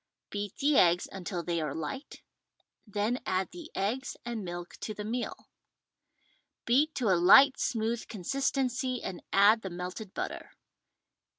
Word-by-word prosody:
Beat 205 -1 -4
the 285 0 +3
eggs 175 0 +4
until 180 -2 -4
they 170 0 -1
are 150 -3 -3
light, 210 - -6 0.6
then 210 +5 -1
add 185 0 -1
the 340 -3 -9
eggs 225 +8 -2
and 235 -3 -4
milk 175 -1 -6
to 215 - -5
the 210 - -5
meal. 240 +3 -4 1.2
Beat 285 +6 +3
to 240 -5 +1
a 185 - +5
light 265 +9 +8
smooth 230 -1 -1
consistency 255 +3 -1
and 180 -2 -5
add 210 +3 +6
the 190 - -5
melted 180 +3 -6
butter. - - -5
210 Hz, 140 wpm, -30 LUFS, 185-255 Hz, 1.2 s, light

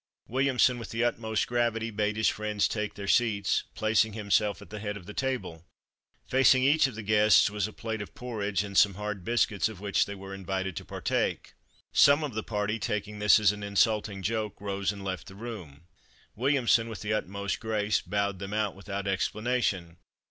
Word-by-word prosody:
Williamson, 130 -1 +2
with 115 - -7
the 115 +1 -1
utmost 110 -2 0
gravity, 115 -2 0
bade 105 0 -1
his 110 - +2
friends 105 -1 0
take 105 -1 -3
their 100 -1 -6
seats, 105 -3 +2
placing 110 0 +2
himself 105 -1 +1
at 90 - -14
the 105 - -6
head 105 -1 -4
of 90 - -12
the 105 - -8
table. 125 -12 -3 0.6
Facing 130 0 +5
each 145 +2 +4
of 130 - -8
the 110 - -6
guests 105 0 +5
was 105 -1 -1
a - - -9
plate 110 0 -5
of 100 - -9
porridge 105 -6 -2
and 100 -1 -8
some 100 -1 +5
hard 105 -2 -5
biscuits 110 -1 +1
of 110 -5 -10
which 100 -1 +1
they 100 - -6
were 95 0 -9
invited 95 -1 -3
to - - -6
partake. - - -2 0.4
Some 145 +2 +6
of 145 -5 -3
the 110 - -2
party 105 +1 -2
taking 105 -1 -3
this 105 +1 +6
as 105 -2 +4
an 105 0 -7
insulting 100 0 +1
joke, 110 0 -2
rose 100 0 -2
and 100 -1 -9
left 95 -1 -4
the 95 - -11
room. 95 -10 -8 0.5
Williamson, 120 -2 +2
with 110 - -7
the 105 0 -1
utmost 100 -1 -2
grace, 110 -2 0
bowed 100 -2 -1
them 100 +1 -5
out 105 -2 0
without 100 0 -6
explanation. 100 -3 -1
105 Hz, 190 wpm, -28 LUFS, 100-115 Hz, 0.6 s, Some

